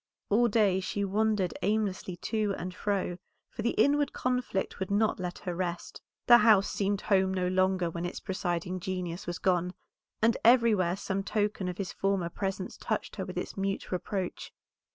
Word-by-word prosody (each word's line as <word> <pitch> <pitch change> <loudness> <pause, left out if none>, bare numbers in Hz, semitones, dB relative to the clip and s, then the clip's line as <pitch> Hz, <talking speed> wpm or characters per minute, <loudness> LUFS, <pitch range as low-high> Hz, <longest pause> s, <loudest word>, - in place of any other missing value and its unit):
All 235 +4 +5
day 205 -4 +3
she 200 +2 -2
wandered 210 -2 +1
aimlessly 200 -3 -1
to 210 +2 -1
and 180 +1 -5
fro, 190 -3 -2 0.3
for - - -5
the 235 +2 0
inward 290 0 +3
conflict 250 -6 -1
would 190 - -3
not 210 +1 +2
let 180 -1 -4
her 180 - -4
rest. 175 -1 -4 0.2
The 240 0 +8
house 210 -3 +5
seemed 200 0 0
home 190 -2 +2
no 185 -1 0
longer 185 -1 +2
when 170 +1 -4
its 175 - -6
presiding 185 -2 -2
genius 180 -2 -4
was 175 -1 -3
gone, 180 -1 0 0.4
and 230 +1 +3
everywhere 225 -7 +5
some 195 0 -2
token 205 -1 -1
of 180 -1 -4
his 195 -2 -4
former 195 -3 0
presence 190 +1 -4
touched - - -3
her - - -3
with - - -7
its - - -4
mute 195 0 -3
reproach. 185 0 -3
190 Hz, 175 wpm, -29 LUFS, 180-210 Hz, 0.4 s, The